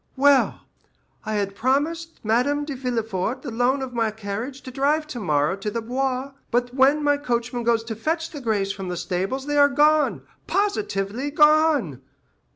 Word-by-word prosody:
Well, 280 0 +4 0.7
I 215 - -1
had 200 -1 -1
promised 295 +9 -1
Madame 270 +7 +1
de 290 - -4
Villefort 230 -3 -2
the 260 - -5
loan 250 +4 +1
of 255 -1 -6
my 230 -2 +1
carriage 220 +6 -6
to 255 - -8
drive 285 +4 +1
tomorrow 180 - 0
to 200 +2 -3
the 230 - -3
Bois; 260 +3 -2 0.2
but 245 +1 0
when 275 +3 +4
my 290 0 +3
coachman 245 -3 -2
goes 230 -1 +2
to 225 -1 -5
fetch 325 +8 -2
the 290 - -7
grays 205 -5 0
from 190 -2 -6
the 180 - -3
stables 185 +10 -2
they 290 0 -1
are 285 0 +7
gone—positively 295 - 0
gone. 300 - +3
255 Hz, 160 wpm, -23 LUFS, 220-290 Hz, 0.7 s, are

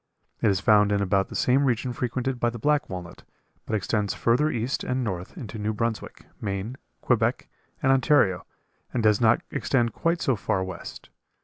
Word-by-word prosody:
It - - +4
is 95 -2 +2
found 105 0 +4
in 100 - +2
about 95 0 +1
the - - -8
same 130 +3 +3
regions 125 -1 0
frequented 125 +1 -2
by 120 - +2
the 120 - -7
black 145 +5 +1
walnut, 90 -2 -7 0.5
but 110 - -1
extends 100 -1 -1
further 120 +10 +2
east 120 0 -2
and 130 0 -1
north 95 -5 -5
into 110 -2 -7
New 105 +1 -1
Brunswick, 115 0 -3 0.2
Maine, 100 +4 -3 0.3
Quebec, - - +1 0.4
and 135 - +4
Ontario, 130 - +3 0.5
and 120 - -1
does 105 0 +4
not 115 0 +4
extend 120 -3 0
quite 170 +1 0
so 130 - +1
far 95 -2 -1
west. 95 -2 -8
115 Hz, 180 wpm, -26 LUFS, 100-125 Hz, 0.5 s, It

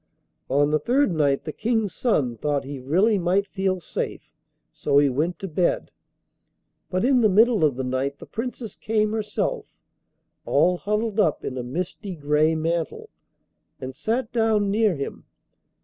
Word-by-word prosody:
On 145 +2 +2
the 155 - +2
third 260 - +2
night 145 -4 +1
the 155 - -5
King's 225 -4 0
son 140 - 0
thought 145 +4 -1
he 140 0 -7
really 190 - +2
might 185 +3 +1
feel 190 -2 -1
safe, 170 - -5 0.4
so 140 - 0
he 145 -1 +5
went 160 +7 -1
to 195 - -6
bed. 175 +1 0 1.0
But 185 +4 0
in 255 -1 +4
the 215 - +5
middle 220 -1 +4
of 145 -4 +3
the 130 - -3
night 130 +2 -2
the - - -11
Princess 230 -1 -5
came 215 -1 0
herself, 220 - -2 0.8
all 180 0 +3
huddled 210 +2 -1
up 165 -8 +2
in 130 - -4
a 125 - -3
misty 180 - -5
grey 150 +1 +2
mantle, 165 +1 -2 0.7
and 130 0 -7
sat 225 - -2
down 220 -3 +2
near 215 -3 +2
him. 140 -1 -6
180 Hz, 160 wpm, -24 LUFS, 145-215 Hz, 1.0 s, he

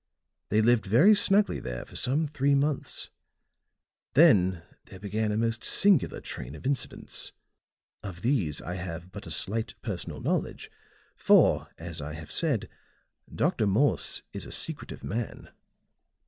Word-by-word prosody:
They 110 +2 +3
lived 115 -2 +3
very 130 - +6
snugly 205 0 +3
there - - -5
for - - -15
some 145 +5 +1
three 140 -1 +1
months; 140 0 -1 1.0
then 95 - +5 0.2
there 95 - -12
began 105 +2 -1
a 105 - -1
most 115 0 -1
singular 195 -8 +3
train 65 +5 -7
of 75 - -12
incidents. 140 0 -4 0.7
Of 90 -3 -8
these 100 - 0
I 90 +2 -4
have 90 0 -6
but 100 -2 -9
a - - -7
slight 110 +8 -2
personal - - -4
knowledge, - - -2 0.4
for, - - +4
as 80 -2 -6
I 75 +1 -5
have 80 -1 -9
said, 145 -11 0 0.6
Dr. 105 - +1
Morse 120 +9 +1
is - - -6
a - - -10
secretive - - -6
man. 115 +2 -5
110 Hz, 140 wpm, -28 LUFS, 90-140 Hz, 1.0 s, very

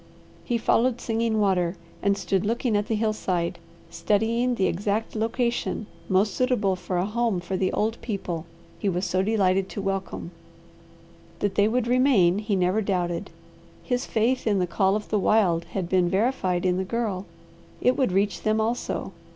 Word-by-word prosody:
He 240 - 0
followed 235 +2 +2
Singing 225 -1 0
Water, 185 -3 +2 0.3
and 200 0 +2
stood 195 -2 0
looking 230 +1 0
at 205 0 0
the 225 - 0
hillside, 200 -6 -1 0.3
studying 225 +7 +1
the 195 - +1
exact 205 +6 -1
location 230 0 -1 0.2
most 195 +1 +2
suitable 225 -6 +1
for 180 0 -3
a 175 - +1
home 225 -2 0
for 175 +2 -4
the 185 0 0
old 225 +2 -1
people 180 -7 -4 0.3
he 205 - 0
was 180 +1 -1
so 185 0 +1
delighted 195 -2 +2
to - - -6
welcome. 195 -3 -3 1.1
That 205 +1 -1
they 205 0 +3
would 240 +1 +1
remain 240 -8 +4
he 210 -1 -1
never 185 +3 +2
doubted. 180 -4 -1 0.5
His 250 0 -1
faith 235 +3 +1
in 205 -2 +3
the 180 - +2
call 190 +3 +1
of 210 - -4
the 210 - +1
wild 185 -6 +3
had 180 +1 -4
been 180 -1 +2
verified 190 -3 0
in 180 0 +2
the 190 - 0
Girl; 200 -2 -2 0.5
it 250 - +3
would 260 -8 +1
reach 195 -2 +1
them 215 0 +1
also. 230 +3 -2
205 Hz, 170 wpm, -25 LUFS, 185-225 Hz, 1.1 s, remain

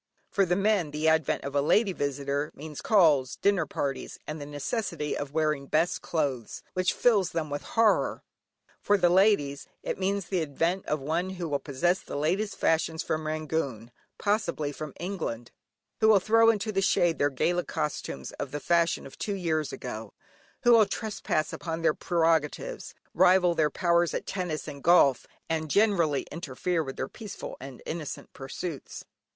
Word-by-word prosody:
For 195 -1 +2
the 175 - +2
men, 200 -4 +2
the 150 +2 -1
advent 160 0 +2
of 140 - -5
a 140 - +2
lady 200 +7 +3
visitor 140 0 -2
means 150 0 -8
calls, 155 - +4
dinner 200 -2 +1
parties, 135 -1 -3
and 150 0 -6
the 145 - -6
necessity 150 - -3
of 145 -1 -4
wearing 155 -3 0
best 160 +5 +1
clothes, 140 -9 -2
which 185 -1 +1
fills 205 -7 +2
them 155 -3 -2
with 145 - -2 0.2
horror. 225 -1 +3 0.6
For 205 - +3
the 175 -2 +3
ladies, 180 -8 +3 0.2
it - - -3
means 195 0 0
the 180 0 -1
advent 165 +5 -1
of 150 - 0
one 165 +7 -1
who 175 -2 -3
will 145 -2 -1
possess 170 +7 0
the - - -8
latest 185 +9 0
fashions 160 0 +1
from 155 0 -2
Rangoon 155 -7 -3 0.3
(possibly 170 -8 0
from 150 -1 -7
England), 165 - -4 0.5
who 220 - +4
will 215 -2 +7
throw 225 +3 +5
into 215 -1 +1
the 195 -2 0
shade 175 -3 +2
their 145 - +3
gala 175 +6 0
costumes 70 - -4
of 140 - -3
the 145 +3 -4
fashion 170 +3 +1
of 135 - -12
two 205 - -2
years 160 -5 -1
ago, - - -7 0.5
who 240 - +6
will 225 -3 +7
trespass 200 -6 -2
upon 165 0 -4
their 160 - +4
prerogatives, 165 - 0 0.2
rival 180 -1 +5
their 155 -2 +2
powers 170 +2 +2
at - - -3
tennis 175 -6 -3
and 140 -2 -7
golf, 155 -7 +5 0.2
and 160 -1 -2
generally 170 -8 +3
interfere 165 +2 -2
with 135 -2 -6
their 130 - -3
peaceful 215 -3 -8
and 135 -2 -9
innocent 160 -3 -6
pursuits. 140 +3 -6
160 Hz, 170 wpm, -28 LUFS, 145-190 Hz, 0.6 s, will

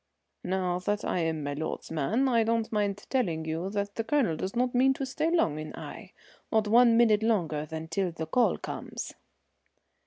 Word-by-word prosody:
"Now 180 -1 -1
that 205 +3 -2
I'm 165 -3 -1
my 145 0 -2
lord's 155 +2 -5
man 180 - +1
I 235 -3 +3
don't 225 0 0
mind 205 -2 -1
telling 175 -12 0
you 165 +4 -2
that 200 0 -2
the 225 - -2
Colonel 250 - +1
does 185 +6 -4
not 250 +1 +1
mean 265 +2 +4
to 270 - -3
stay 305 +5 -1
long 165 - +1
in 155 0 -7
Aix, - - -9 0.4
not 220 -1 +2
one 235 +1 +6
minute 220 -3 +5
longer 165 -9 0
than 160 +1 -6
till 180 +2 -1
the 160 -1 -5
call 240 +10 +2
comes." - - -6
205 Hz, 185 wpm, -28 LUFS, 160-235 Hz, 0.4 s, one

